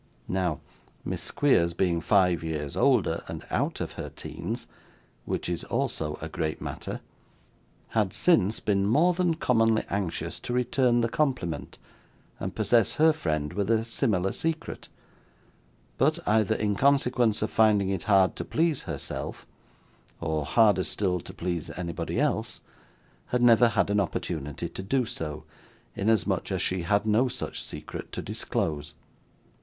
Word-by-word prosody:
Now, 90 -6 -1 0.4
Miss - - -2
Squeers 85 -13 +2
being 85 -2 +1
five 90 -2 +3
years 75 -3 -3
older, - - +3
and - - -7
out - - 0
of - - -3
her - - -6
teens - - -6 0.6
(which - - -2
is 85 -1 -2
also 75 -1 -2
a 80 - -5
great 80 0 -3
matter), - - -5 0.9
had, 105 -4 +1
since, 115 - +3
been 100 -2 +1
more 160 +11 +4
than 175 -2 +1
commonly 115 -7 +2
anxious 95 -5 -2
to 120 - -5
return 125 0 +2
the 115 - +2
compliment, 115 - -2 0.6
and - - -4
possess 115 -5 +3
her 160 +1 +5
friend 75 - -2
with 100 +1 -1
a 115 0 +2
similar 105 -6 0
secret; 160 -1 -3 1.1
but, 155 +5 +3
either 110 -1 +3
in 105 -1 0
consequence 125 -4 +3
of 110 - -2
finding 105 -3 +4
it 95 -3 -2
hard 95 -2 +4
to - - -3
please 160 -3 0
herself, 80 -6 -5 0.7
or 80 -3 -1
harder 105 +2 +4
still 90 -3 0
to - - -9
please 85 -2 -3
anybody 85 -2 -3
else, - - -1 0.7
had 125 0 0
never 120 0 +7
had 105 - +1
an 105 - +3
opportunity 80 -6 -3
so - - -6
to - - -4
do, 95 - -2 0.5
inasmuch 105 -2 +1
as - - 0
she 95 -1 0
had 100 +4 +1
no 110 +4 +3
such 125 - -4
secret - - -8
to - - -5
disclose. 75 -1 -3
100 Hz, 145 wpm, -27 LUFS, 85-120 Hz, 1.1 s, never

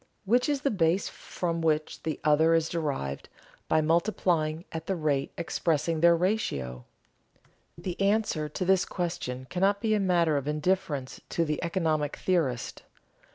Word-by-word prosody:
Which 245 +7 +3
is 285 -2 0
the 280 - +1
base 180 -1 +2
from 170 -2 -4
which 155 -1 0
the 160 -2 -3
other 155 +2 +4
is 165 0 +1
derived 140 - -3 0.4
by 160 - +3
multiplying 165 -1 +1
at 160 -1 -6
the 195 - 0
rate 150 -4 0
expressing 165 -1 0
their 170 0 +6
ratio? 70 - -1 0.9
The 175 +2 -5
answer 195 -7 +1
to 180 +5 -3
this 190 0 +4
question 130 -8 -4
cannot 195 +3 +2
be 220 -1 +1
a 215 - +2
matter 170 -5 +2
of 140 0 -3
indifference 150 -3 -1
to 165 - 0
the 150 +1 -2
economic 160 -4 0
theorist. 150 -10 -1
165 Hz, 150 wpm, -28 LUFS, 150-185 Hz, 0.9 s, their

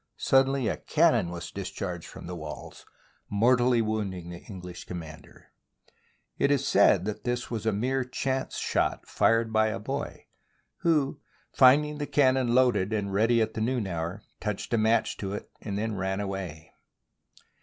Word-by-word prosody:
suddenly 135 -2 +3
a - - -1
cannon 150 - +2
was 85 0 -6
discharged 95 -3 -5
from - - -10
the 90 - -6
walls, 75 -5 -9 0.4
mortally 120 +2 +3
wounding 100 -5 -3
the 85 - -8
English 90 -4 -9
commander. 80 -3 -10 0.9
It 140 - +3
is 140 -1 +2
said 100 -2 +4
that 105 0 -4
this 120 0 -2
was 110 -1 -3
a - - +4
mere 130 +6 0
chance 130 +1 -2
shot - - 0
fired 115 0 +2
by 110 0 +4
a 110 - -2
boy, - - -5 0.5
who, 150 -4 +1 0.3
finding 150 +3 +5
the 145 - -3
cannon 130 -3 +3
loaded 125 -6 +3
and 100 -3 -2
ready 115 +3 +3
at 110 0 -4
the 110 - -3
noon 120 -1 0
hour, 85 +2 -4 0.2
touched 105 +2 -4
a - - +4
match 110 +2 +2
to 100 -1 -4
it 105 - -7
and 100 -2 -4
then 110 +1 -1
ran 95 0 -2
away. 95 -6 -5
110 Hz, 160 wpm, -28 LUFS, 95-125 Hz, 0.9 s, finding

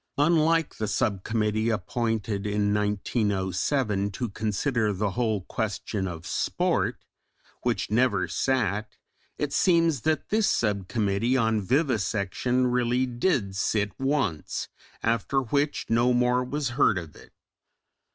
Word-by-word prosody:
Unlike 165 +1 +2
the 110 - -2
sub 105 -2 0
committee 110 0 0
appointed 110 -1 -1
in 105 0 +1
1907 105 - 0
"to 115 +4 -4
consider 110 +2 0
the 100 +1 -1
whole 110 -2 0
question 100 0 -3
of 85 -2 -7
sport" - - -1 0.6
which - - -1
never 110 -5 +2
sat, 110 -5 0 0.5
it 145 -1 -2
seems 165 - +3
that 155 +2 0
this 215 -1 +2
sub 100 -4 0
committee 110 +4 +1
on 110 -3 +2
vivisection 120 - 0
really 125 +1 +1
did 120 - 0
sit 105 +1 0
once, 135 - -1 0.3
after 115 +4 +1
which 140 +3 -1
no 120 +2 +3
more 125 +1 +2
was 140 +1 -2
heard 125 -5 +3
of 85 -4 -7
it. - - -16
115 Hz, 120 wpm, -26 LUFS, 100-130 Hz, 0.6 s, seems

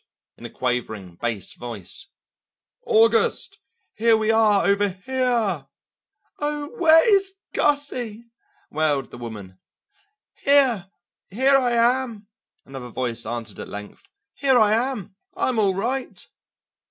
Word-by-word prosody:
in - - -9
a - - -14
quavering 110 -8 -3
bass 115 -4 -3
voice. 115 -7 -7 0.8
"August, 225 - +2 0.3
here 225 +1 +3
we 220 0 +1
are 215 -3 +4
over 200 0 +2
here!" 215 - -1 0.7
"Oh, 295 0 -3
where 325 +1 +6
is 390 0 -1 0.2
Gussie?" 250 -6 -1 0.5
wailed 145 -4 0
the - - -10
woman. 105 -6 -9 0.8
"Here, 260 -9 +3 0.4
here 265 +7 +3
I 250 -3 +2
am," 235 -2 +1 0.4
another 135 -2 -8
voice 115 -2 -3
answered 115 -3 -5
at - - -7
length; 105 0 -10 0.2
"here 270 -3 +2
I 215 -2 +4
am, 225 -5 -2 0.2
I'm 250 -3 +1
all 195 -3 +2
right." 250 +7 -3
215 Hz, 115 wpm, -23 LUFS, -, 0.8 s, where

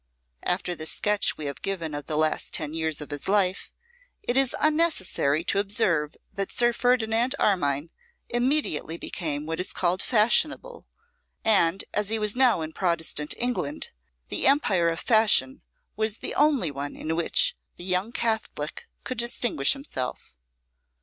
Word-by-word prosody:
After 180 0 -1
the 155 -1 -3
sketch 210 +3 +2
we 155 - -6
have 140 -2 -5
given 170 -6 -3
of 145 -1 -6
the 155 - -1
last 155 0 0
ten 155 -1 -3
years 160 -2 -2
of 150 - -8
his 145 -1 -4
life, 195 -2 +1 0.5
it 245 - -1
is 270 -1 +3
unnecessary 300 - +1
to 195 - +1
observe 185 -7 0 0.2
that 195 -1 -3
Sir 240 0 +2
Ferdinand 240 +1 +1
Armine 155 - 0 0.4
immediately 240 - +1
became 150 -4 -3
what 160 +1 -4
is 180 - -2
called 180 +1 0
fashionable; 300 - +1 0.6
and, 195 -4 +3
as 210 -1 0
he 225 - +2
was 210 0 0
now 250 -8 +3
in 160 0 -6
Protestant 165 -4 -1
England, 180 -12 -2 0.4
the - - +2
empire 195 - +3
of 165 - -3
fashion 215 - +3 0.3
was 220 0 +1
the - - -3
only 280 - +2
one 140 +1 -6
in 160 +1 -3
which - - +3 0.2
the - - -5
young 185 +4 0
Catholic 220 -11 -3 0.2
could 255 -3 -5
distinguish 235 - +2
himself. 275 - -6
190 Hz, 150 wpm, -25 LUFS, 155-235 Hz, 0.6 s, is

